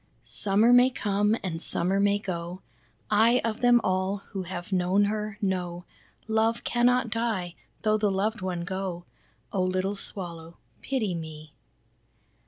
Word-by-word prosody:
Summer 210 +4 +3
may 250 +1 +7
come 210 -2 +1
and 165 -4 -3
summer 190 +3 +1
may 205 0 +3
go, 180 -2 -5 0.5
I 225 +4 +5
of 225 +1 -2
them 245 -1 +6
all 190 +2 0
who 195 - -4
have 175 0 -6
known 185 +2 +3
her, 210 0 -2
know 180 -2 -2 0.4
Love 220 +1 +1
cannot 245 0 +2
die, 220 -7 -1 0.3
though 215 0 +2
the 210 -1 +2
loved 200 +3 -1
one 180 -2 -2
go. 185 -1 -4 0.5
Oh 195 - +1
little 185 +2 0
Swallow 170 -4 -5 0.2
pity 230 -9 -1
me!" 155 -2 -8
195 Hz, 140 wpm, -27 LUFS, 180-220 Hz, 0.5 s, may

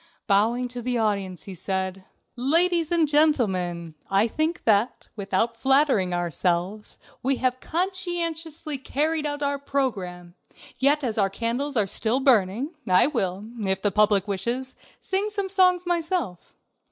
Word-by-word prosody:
Bowing 225 +5 +2
to 245 0 -6
the 245 +1 -1
audience, 200 -5 -1
he 195 - -8
said: 190 +1 -3 0.3
"Ladies 330 +6 +2
and 335 -2 +3
gentlemen, 190 - +1 0.2
I 195 +3 +3
think 315 +8 -2
that, 230 +3 +1
without 205 +3 -1
flattering 265 -6 +2
ourselves, 175 +3 -1 0.2
we 270 +2 +1
have 255 0 -1
conscientiously 335 -4 -2
carried 300 +3 -1
out 290 0 -4
our 280 0 -1
program, 195 -12 -3 0.5
yet 285 +2 +3
as 225 -4 -1
our 195 -1 +3
candles 240 +7 -2
are 210 - +4
still 220 +6 +1
burning, 250 - +2
I 185 0 +6
will, 200 -8 -2 0.2
if 190 -1 -1
the 205 - +2
public 205 0 +3
wishes, 235 +7 -2 0.3
sing 395 +2 -1
some 400 -2 -3
songs 365 -2 +3
myself. 335 - -2
245 Hz, 140 wpm, -25 LUFS, 195-300 Hz, 0.5 s, I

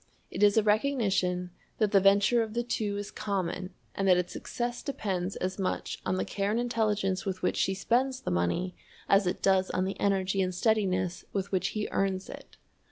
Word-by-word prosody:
It - - -4
is 205 +1 +5
a 220 - +5
recognition 200 -6 +1 0.3
that 215 -2 +2
the 195 - +6
venture 200 +5 +4
of 220 0 -4
the 240 - +1
two 210 -4 -2
is 205 0 -5
common 185 -2 -3 0.2
and 195 - -1
that 180 -1 +6
its 180 0 -2
success 240 0 -4
depends 195 - -3
as 185 +2 -3
much 190 - -2
on - - +1
the - - -1
care 200 0 -2
and 220 +3 +1
intelligence 210 -5 0
with 190 -2 -4
which - - +1
she 190 - +1
spends 255 +6 +1
the - - -3
money 90 - 0 0.3
as 195 -1 +4
it 180 - -2
does 190 -1 +3
on 185 - 0
the 195 - -4
energy 195 -1 +1
and 185 -1 -1
steadiness 185 -4 +1
with 195 -1 -2
which 190 -2 +1
he 210 - -1
earns 195 -1 -1
it. - - -12
195 Hz, 200 wpm, -29 LUFS, 185-215 Hz, 0.3 s, the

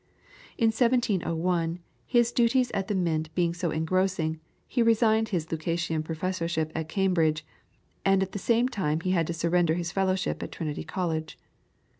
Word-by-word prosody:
In 225 -2 +4
1701, 180 -8 +1 0.3
his 240 -1 +3
duties 245 +1 +2
at 195 -1 -2
the 205 - -1
Mint 160 -4 0
being 170 -2 +1
so 175 0 -2
engrossing, 160 0 0 0.3
he 245 - 0
resigned 225 -1 +3
his 175 -6 -1
Lucasian 165 0 -1
professorship 165 -1 -2
at 160 -1 -4
Cambridge, 165 -5 +1 0.6
and 195 0 +3
at 190 - -5
the 200 - -4
same 235 +5 +2
time 160 -10 -1
he 185 - -1
had 170 -4 +2
to 170 - -2
surrender 170 0 +2
his 175 0 -3
fellowship 190 -1 0
at - - -5
Trinity 155 -3 -4
College. 160 -1 -3
175 Hz, 155 wpm, -27 LUFS, 160-195 Hz, 0.6 s, In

